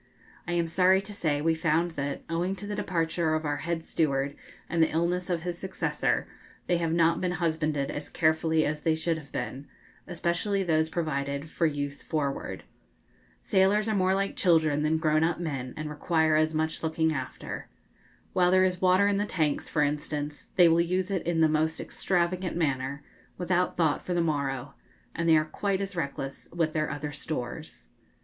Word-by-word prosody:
I 175 - -1
am 170 -1 +2
sorry 185 +3 +4
to 200 +2 -6
say 150 -6 0
we 165 0 +3
found 165 +1 +1
that, 140 -3 -4
owing 175 +3 -1
to 200 - -7
the 205 - -4
departure 165 -4 0
of 155 0 -2
our 145 0 0
head 165 0 -3
steward 140 -2 0 0.3
and 170 -1 0
the 160 - +5
illness 175 +3 0
of 170 -2 -1
his 175 -1 -3
successor, 190 0 -1 0.4
they 175 - +2
have 165 -1 -1
not 165 0 +3
been 180 -1 0
husbanded 155 -4 0
as 145 - -6
carefully 160 -1 +2
as 150 0 -2
they 160 0 +2
should 160 0 -1
have 145 -3 -15
been, 140 +2 -4 0.4
especially 180 +4 0
those 160 -2 +2
provided 140 -2 -2
for 165 - +2
use 145 -1 -3
forward. 145 -3 -3 0.8
Sailors 200 +3 +2
are 220 - +1
more 190 0 +3
like 195 0 -1
children 160 -5 +3
than 155 +1 +2
grown 155 -1 +2
up 165 0 +1
men, 135 -7 -3
and 155 0 -4
require 160 +1 +1
as 155 +1 +2
much 160 0 -1
looking 160 0 +1
after. 130 -3 -6 0.6
While 180 -1 +4
there 185 +1 +5
is 185 -1 0
water 185 +2 +5
in 200 -1 +2
the 205 +1 0
tanks, 155 -7 -1
for 150 - +2
instance, 145 0 -3
they 175 -2 +7
will 165 +1 +4
use 185 +3 0
it 185 -4 -2
in 165 -1 +2
the 160 - +6
most 155 +1 +1
extravagant 180 0 -1
manner, 140 -2 -1 0.3
without 180 0 0
thought 160 -4 +2
for 180 - -2
the 175 - +2
morrow; 140 -4 -1 0.4
and 170 0 0
they 160 - +7
are 155 - +2
quite 195 +4 -1
as 195 -1 -4
reckless 140 -4 -4
with 165 -2 0
their 155 -1 0
other 145 +1 -4
stores. 125 - -6
160 Hz, 185 wpm, -28 LUFS, 150-175 Hz, 0.8 s, they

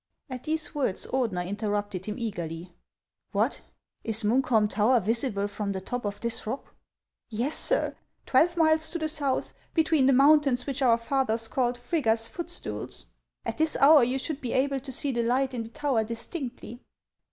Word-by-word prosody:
At 250 -1 -6
these 315 0 -1
words 270 -10 -1
Ordeuer 225 -9 -1
interrupted 205 -1 -3
him 210 - -3
eagerly. 175 -6 -5 0.3
" - - -57
What! - - 0 0.4
is 225 0 -1
Munkholm 220 -1 +3
tower 220 +5 +3
visible 220 -1 0
from 200 0 -3
the 190 - -3
top 245 +5 -5
of 205 0 -3
this 235 -2 -2
rock? 255 +5 -5 0.2
" - - -64
" - - -64
Yes, 245 +7 -1
sir; - - +2 0.3
twelve 340 +6 +3
miles 315 -1 +4
to - - -3
the 315 -1 -1
south, 290 -4 -2 0.2
between 315 -4 +3
the - - +6
mountains 275 -2 +4
which 275 -1 -3
our 240 -3 +5
fathers 230 -2 0
called 245 0 0
Frigga's 230 -4 0
Footstools. 345 0 -5 0.4
At - - -4
this 315 0 +2
hour 290 -1 +7
you 250 +3 +1
should 285 +2 -4
be 245 - -3
able 275 +1 +1
to 265 +1 -7
see 275 +2 -1
the 240 -2 0
light 255 +3 +1
in 240 - -3
the 225 - -7
tower 275 -4 0
distinctly." 240 +1 -5
250 Hz, 180 wpm, -27 LUFS, 220-280 Hz, 0.4 s, hour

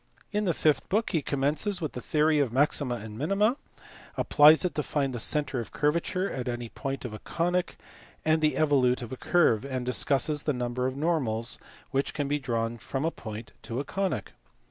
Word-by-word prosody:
In 210 0 0
the 175 - +2
fifth 155 -2 +1
book 215 +3 +1
he 165 -5 +1
commences 150 +9 0
with 155 -5 -3
the 125 - -6
theory 155 +2 +2
of 135 -5 +1
maxima 135 -1 +1
and 110 -1 -8
minima; 200 - +2 0.6
applies 155 +4 +6
it 180 - -1
to 150 - -1
find 140 -2 -1
the 120 - -3
centre 145 +1 +1
of 115 - -6
curva 150 +3 +1
ture 185 +3 -2
at 125 -7 -4
any 120 -1 -3
point 135 +2 -5
of 120 - -5
a 110 - -7
conic, 175 - -1 0.5
and 160 0 +3
the 155 -1 +2
evolute 130 -5 +3
of 115 - -8
the - - -3
curve; 130 -11 +3
and 130 -2 -3
discusses 140 +3 +2
the 150 - 0
number 125 0 -2
of 130 +1 -4
normals 130 -8 -1 0.3
which 135 +1 -1
can 145 -2 -1
be 145 +1 0
drawn 115 -3 -2
from 135 +5 -3
a 165 - +1
point 110 -4 -8
to 120 +2 -4
a - - -1
conic. 195 +4 -2
140 Hz, 205 wpm, -28 LUFS, 125-160 Hz, 0.6 s, applies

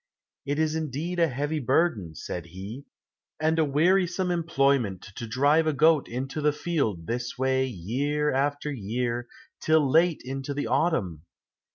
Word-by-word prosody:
"It 145 +1 0
is 155 0 +1
indeed 160 +3 -3
a 165 - +5
heavy 145 +3 -2
burden," 130 - +1
said 85 +3 -6
he, 100 - -8 0.5
"and 160 +1 +1
a - - +5
wearisome 180 +5 +2
employment 140 - +1
to 115 - -6
drive 145 +7 +3
a 155 - +2
goat 155 +1 +4
into 135 +5 -4
the 150 0 +3
field 140 - -2
this 120 +4 -3
way 130 0 +1
year 135 - -1
after 145 +2 0
year, 120 +1 -2 0.3
till 155 -2 +3
late 165 +4 +3
into 135 +2 -4
the 145 - -2
autumn! 95 - 0
140 Hz, 150 wpm, -26 LUFS, 120-160 Hz, 0.5 s, a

